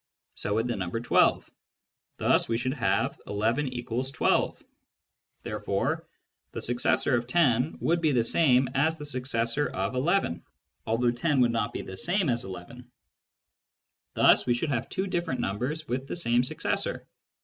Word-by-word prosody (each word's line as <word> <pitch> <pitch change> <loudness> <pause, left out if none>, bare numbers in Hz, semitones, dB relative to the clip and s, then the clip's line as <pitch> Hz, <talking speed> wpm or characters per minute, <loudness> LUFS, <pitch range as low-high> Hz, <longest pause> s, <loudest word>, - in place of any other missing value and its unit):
So 100 - -2
would 115 +2 0
the 120 - -1
number 95 +3 -3
12. 120 - +3 0.7
Thus - - +2
we 115 - +1
should 130 +2 -1
have 125 -5 0
11 115 +7 0
= 125 +3 -2
12; - - +1 0.8
therefore - - -2 0.5
the - - -4
successor 120 +2 +1
of 120 0 -1
10 130 -2 +2
would 170 +1 +1
be 155 -2 +3
the 120 -4 +2
same 130 -1 +3
as 160 +4 +1
the 150 - -7
successor 125 0 -1
of 95 +4 -2
11, 135 - 0 0.4
although 120 +2 +2
10 135 +3 +1
would 120 -1 +4
not 115 -1 -1
be - - -5
the 95 - -8
same 180 - +1
as 120 -1 +1
11. 105 +7 -10 1.3
Thus - - +5
we 120 - +3
should 145 +6 -2
have 125 -5 -2
two 190 - -2
different 175 -7 -2
numbers 130 +11 -3
with 130 +2 -3
the - - -4
same 120 -8 +2
successor. 125 - -3
125 Hz, 160 wpm, -27 LUFS, 115-145 Hz, 1.3 s, Thus